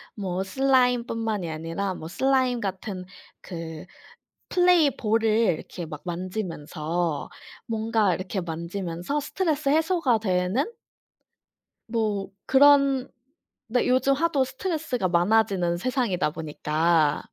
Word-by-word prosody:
뭐 190 -2 -2
슬라임뿐만이 235 -4 +1
아니라 165 +5 -3
뭐 160 - -8
슬라임 255 +6 +1
같은 190 -2 -4 0.4
그 165 -3 -7 0.6
플레이볼을 300 - +3
이렇게 210 -6 0
막 150 -2 -8
만지면서 170 -3 -3 0.4
뭔가 220 -3 +1
이렇게 185 +1 -3
만지면서 175 - -3
스트레스 310 -2 -1
해소가 315 -5 +2
되는 185 +4 0 1.2
뭐 215 -4 -1 0.2
그런 275 -1 +5 0.6
네 245 +2 +1
요즘 260 +2 +3
하도 290 -2 +2
스트레스가 265 - -2
많아지는 180 -1 +2
세상이다 230 - 0
보니까 155 0 +1
210 Hz, 250 characters per minute, -25 LUFS, 175-260 Hz, 1.2 s, 그런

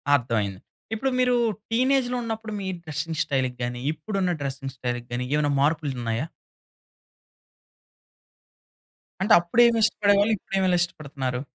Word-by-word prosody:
అర్థం 120 -4 0
అయింది. 100 -2 -4 0.3
ఇప్పుడు 265 +5 0
మీరు 250 -1 +3 0.4
టీనేజ్‌లో 255 +1 +2
ఉన్నప్పుడు 225 -1 -4
మీ 190 - -4 0.2
డ్రెసింగ్ 155 0 -4
స్టైల్‌కి 130 -4 -1
గాని, 120 0 -3
ఇప్పుడు 160 +7 -5
ఉన్న 180 -1 +2
డ్రెసింగ్ 135 -1 -4
స్టైల్‌కి 120 -1 -3
గాని, 125 +1 -2
ఏమైనా 150 -1 +2
మార్పులు 150 0 +1
ఉన్నాయా? 115 +4 -1 3.0
అంటే, 210 +3 +4
అప్పుడేమి 230 +7 +4
ఇష్టపడేవాళ్ళు? 205 -1 +3
ఇప్పుడేమి 190 -1 0
ఇష్టపడుతున్నారు? 140 -7 -3
155 Hz, 120 wpm, -25 LUFS, 130-215 Hz, 3.0 s, అంటే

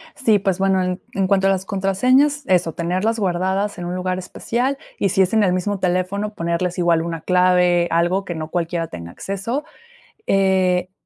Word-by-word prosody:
Sí, 225 -7 +3
pues, 195 -1 -1
bueno, 190 -1 +2
en 180 0 -3
en 195 -1 0
cuanto 195 0 +3
a - - +4
las 190 -1 0
contraseñas, 250 +10 +2
eso, 175 -3 +2
tenerlas 185 +7 -1
guardadas 190 +2 -1
en 175 - -5
un 175 +1 -3
lugar 185 0 -2
especial 245 +8 -2 0.2
y 200 - +2
si 190 - +2
es 185 +3 +1
en 220 - +4
el 185 -3 +2
mismo 195 +2 -1
teléfono, 185 +3 -1
ponerles 170 0 -2
igual 170 -2 +2
una 165 -1 -4
clave, 180 -1 +3
algo 175 +4 +1
que 175 -3 -5
no 155 0 -5
cualquiera 170 -1 -2
tenga 85 - -9
acceso, 210 - -4 0.6
eh, 185 -2 +2
185 Hz, 185 wpm, -20 LUFS, 175-195 Hz, 0.6 s, a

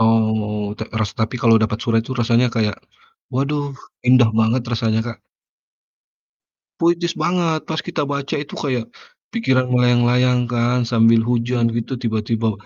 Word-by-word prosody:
Oh, 110 -2 +1
ta - - -4 0.2
ras 105 -2 -1
tapi 110 +3 -1
kalau 115 -1 +5
dapat 110 -1 0
surat 115 -1 +2
itu 130 - -6
rasanya 120 +1 +3
kayak 105 -2 0 0.6
waduh 140 +3 -1 0.4
indah 125 -3 +6
banget 115 +3 +2
rasanya 110 -1 +1
Kak. 120 - -6 1.6
Puitis 170 0 +1
banget, 170 -3 0
pas 160 -1 -3
kita - - -3
baca 140 -1 -3
itu 145 0 -6
kayak, 125 -5 -2 0.5
pikiran 130 - +1
melayang-layang 125 0 +3
kan 120 +1 +1
sambil 115 0 +4
hujan 120 0 +1
gitu, 120 +3 -3
tiba-tiba 110 -1 -1
120 Hz, 135 wpm, -20 LUFS, 115-130 Hz, 1.6 s, indah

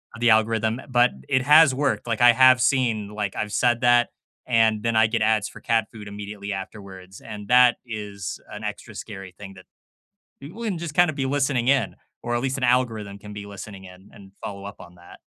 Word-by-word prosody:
of 115 - -11
the 120 - +4
algorithm, 110 +1 +2
but 125 -1 +3 0.2
it 130 - +1
has 150 0 +6
worked, 140 -3 -1
like, 115 0 -2
I 120 - +8
have 130 +1 +5
seen 115 -7 +1
like, 105 -2 -4
I've 105 - -3
said 120 +1 +1
that, 120 -1 +3 0.4
and 110 -3 +2
then 115 0 -1
I 110 0 +5
get 110 0 -2
ads 110 -1 +1
for - - -13
cat 115 -2 0
food 105 -3 -11
immediately 100 0 -7
afterwards, 95 -1 -9
and 105 -2 -9
that 125 -1 +5
is 105 -4 -6
an - - -9
extra - - -7
scary 95 -4 -9
thing 100 -1 -10
that 95 - -15 0.7
people 170 +12 -10
can 205 -6 -2
just 165 -3 -6
kinda 175 -3 +4
be 140 -2 -3
listening 135 -3 0
in, 130 -6 +1 0.3
or 120 - -3
at 120 - -1
least 135 +1 -2
an 130 - -4
algorithm 115 -5 0
can 105 - -11
be 100 0 -8
listening 100 -1 -10
in, 95 +1 -15
and 95 -1 -16
follow 100 -1 -7
up 100 +1 -10
on 90 - -14
that. 85 0 -16
110 Hz, 210 wpm, -23 LUFS, 100-125 Hz, 0.7 s, I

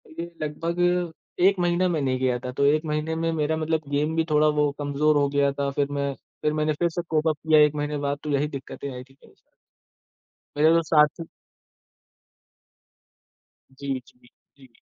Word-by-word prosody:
ये 165 +2 -6 0.2
लगभग 165 +3 -3 0.7
1 195 -1 +4
महीना 175 +1 +2
मैं 165 -4 0
नहीं 130 -2 0
गया 130 -1 +1
था, 125 +1 -6
तो 140 +2 0
1 155 +3 +3
महीने 150 +1 -2
में 165 0 -1
मेरा 155 0 0
मतलब 160 0 0
गेम 150 +3 0
भी 165 - +2
थोड़ा 150 0 +4
वो 145 -1 +3
कमज़ोर 145 +1 +1
हो 145 -1 +3
गया 140 0 +2
था। 140 0 -2
फिर 140 0 0
मैं 140 -1 -1 0.3
फिर 150 - +1
मैंने 155 0 0
फिर 170 +3 0
से 170 +1 -3
कोप 155 0 +1
अप 155 -2 +1
किया 155 0 +4
1 150 0 +4
महीने 150 0 -2
बाद 140 0 -1
तो 150 - -5
यही 145 +1 +1
दिक्कतें 140 0 -7
आई 125 0 -7
थी 135 +1 -22
मेरे - - -19 1.2
मेरे 155 +2 +5
तो 165 - +4
साथी 150 0 +3 2.5
जी, 135 0 -4
जी, 125 - -23 0.4
जी। 130 -3 -18
150 Hz, 185 wpm, -25 LUFS, 140-160 Hz, 2.5 s, मेरे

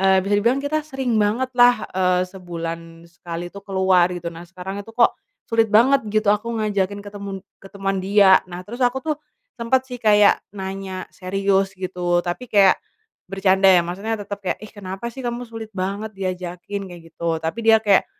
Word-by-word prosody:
eee, 190 -1 +4
bisa 200 - -2
dibilang 240 +5 +2
kita 310 +2 0
sering 265 -7 -1
banget 240 +6 0
lah, 245 0 +5
eee, 180 -1 +2
sebulan 165 -2 -7
sekali 175 0 -7
itu 200 - -9
keluar 190 -2 +3
gitu. 175 -1 -5
Nah 170 +1 -11
sekarang 190 +2 -6
itu 205 - -12
kok, 235 - +5 0.4
sulit 225 -1 +3
banget 230 +3 +4
gitu 215 0 +2
aku 210 +2 +1 0.2
ngajakin 200 -1 -1
ketemen 200 -2 -7 0.2
ketemuan 195 0 -3
dia, 195 0 +6
nah 180 0 -8
terus 235 +6 -9
aku 255 +1 +1
tuh, 310 -2 -1 0.4
sempet 245 +3 +2
sih 250 -2 -8
kayak 210 -3 +5 0.2
nanya 190 -1 -6
serius 195 +1 0
gitu, 180 -2 -1
tapi 180 +8 -4
kayak 200 -4 +5 0.5
bercanda 195 0 +2
ya, 180 -2 +7
maksudnya 195 +6 -3
tetap 205 -1 -6
kayak, - - -2
"ih 215 - -9
kenapa 200 +3 -6
sih 255 +1 -7
kamu 240 +1 -3
sulit 225 -2 -8
banget 200 +3 -3
diajakin." 185 +1 -5
kayak 175 -2 -11
gitu. 165 -1 -1
Tapi 165 +8 -3
dia 225 0 +8
kayak, 200 -3 +4
195 Hz, 180 wpm, -22 LUFS, 185-220 Hz, 0.5 s, dia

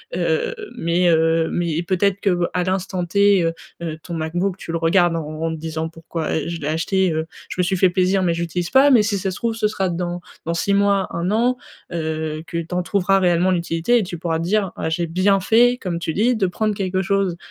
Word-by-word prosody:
heu, 480 +1 0 0.2
mais, 175 +2 +2
heu, 165 0 +3
mais 175 -1 -1
et - - +1
peut-être 190 +2 +1
que, 180 -3 +1
à 180 - 0
l'instant 185 0 -2
T, 200 +1 +4
heu 165 0 0 0.3
heu, 160 -2 -4
ton 175 - -7
MacBook, 175 +4 -2
tu 170 - -7
le 165 - 0
regardes 170 +1 +3
en 165 - -2
en 155 +1 -3
en - - -1
te 160 - -4
disant: 160 0 -4
«Pourquoi, 165 -1 -5
heu, 155 - -3
je 170 -1 -5
l'ai 145 - -3
acheté, 175 +3 +1
heu, 160 0 -1 0.2
je - - -5
me - - +4
suis 180 +2 0
fait 185 0 +4
plaisir 185 +1 +2
mais 175 -2 +1
je 170 - -3
l'utilise 170 +1 -2
pas», 270 +2 +5
mais 240 -5 +6
si 210 -1 0
ça 190 0 -2
se - - -6
trouve 230 -1 -1
ce 220 -1 +1
sera 195 -3 -1
dans 175 0 -3 0.2
dans 165 - -1
6 200 +4 +1
mois, 200 -1 +2
1 170 +3 -2
an, 240 +4 +2 0.3
heu, 160 -2 -3
que 170 +1 -5
tu 170 +2 -5
en 180 - 0
trouveras 195 +1 +2
réellement 180 0 +2
l'utilité 170 +5 +1
et 230 - +1
tu 175 -2 -6
pourras 165 -1 -1
dire: 190 +3 0
«Ah, - - -3
j'ai 170 +1 -1
bien 185 +4 +2
fait, 240 +5 +4
comme 180 -3 -2
tu 165 -1 -3
dis, 240 +7 +2
de 210 -4 +1
prendre 210 +4 -1
quelque 190 -1 -1
chose, 195 -2 0
180 Hz, 245 wpm, -21 LUFS, 165-195 Hz, 0.3 s, mais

